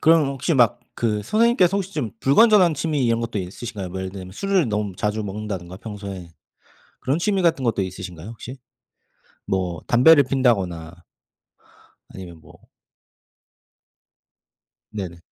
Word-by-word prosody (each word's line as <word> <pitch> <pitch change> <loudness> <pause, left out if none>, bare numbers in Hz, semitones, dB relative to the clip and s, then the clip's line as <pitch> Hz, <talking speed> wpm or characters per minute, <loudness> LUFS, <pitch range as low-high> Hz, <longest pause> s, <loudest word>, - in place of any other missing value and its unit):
그럼 160 -2 +5
혹시 140 +5 -1
막 120 -2 +3 0.2
그 105 -3 0
선생님께서 215 - +3
혹시 195 -1 -4
좀 125 -9 -2
불건전한 185 - +5
취미 150 -2 -1
이런 115 0 +1
것도 115 -2 -3
있으신가요? 95 +1 -6
뭐 95 +1 -5
예를 95 0 -4
들면 95 -1 -9
술을 190 - +1
너무 105 -3 -2
자주 105 +1 -1
먹는다든가 95 -3 -6
평소에. 100 -4 -8 0.7
그런 135 +5 0
취미 195 +1 0
같은 165 -6 +2
것도 115 -4 +1
있으신가요 90 -1 -7
혹시? 120 +3 -9 0.9
뭐 90 -4 -2
담배를 140 +4 +6
피운다거나 95 -11 0 1.1
아니면 85 -4 -11
뭐 - - -17 2.4
네네. 95 -5 -6
110 Hz, 305 characters per minute, -22 LUFS, 95-145 Hz, 2.4 s, 담배를